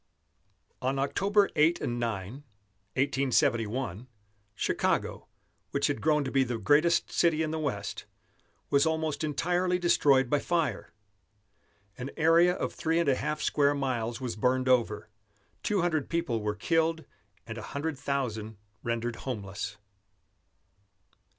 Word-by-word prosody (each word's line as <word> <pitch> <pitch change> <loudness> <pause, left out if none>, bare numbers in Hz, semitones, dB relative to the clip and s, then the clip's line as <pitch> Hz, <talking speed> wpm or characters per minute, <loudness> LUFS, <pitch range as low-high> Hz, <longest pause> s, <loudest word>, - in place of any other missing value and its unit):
On 130 +2 0
October 195 +9 +2
8 165 +2 +4
and 120 0 -2
9, 110 -3 -3 0.6
1871, 125 -4 0 0.5
Chicago, - - -1 0.4
which - - 0
had 110 - -1
grown 150 -2 +2
to 130 - -4
be 135 -1 +3
the 120 -2 -3
greatest 150 - +3
city 160 -2 +2
in 155 - -2
the 160 - -2
West, 105 -10 -3 0.7
was 140 +3 +4
almost 160 -1 -1
entirely 180 +4 +1
destroyed 140 -7 +4
by 145 +3 +2
fire. 165 0 -1 1.1
An 125 +2 -4
area 165 +2 +5
of - - -3
three 160 0 0
and 170 -4 +2
a - - +5
half 150 +3 -3
square 145 -1 +2
miles 120 -4 -2
was 125 -4 -4
burned 130 +3 +1
over; 115 -4 +2 0.5
two 205 -3 +1
hundred 160 -5 0
people 165 -10 -1
were 105 0 -2
killed 165 +3 0 0.4
and 115 0 -6
a 110 - -8
hundred 145 +3 -3
thousand 120 -6 -3 0.2
rendered 115 0 -2
homeless. 100 -4 -5
140 Hz, 130 wpm, -29 LUFS, 115-160 Hz, 1.1 s, area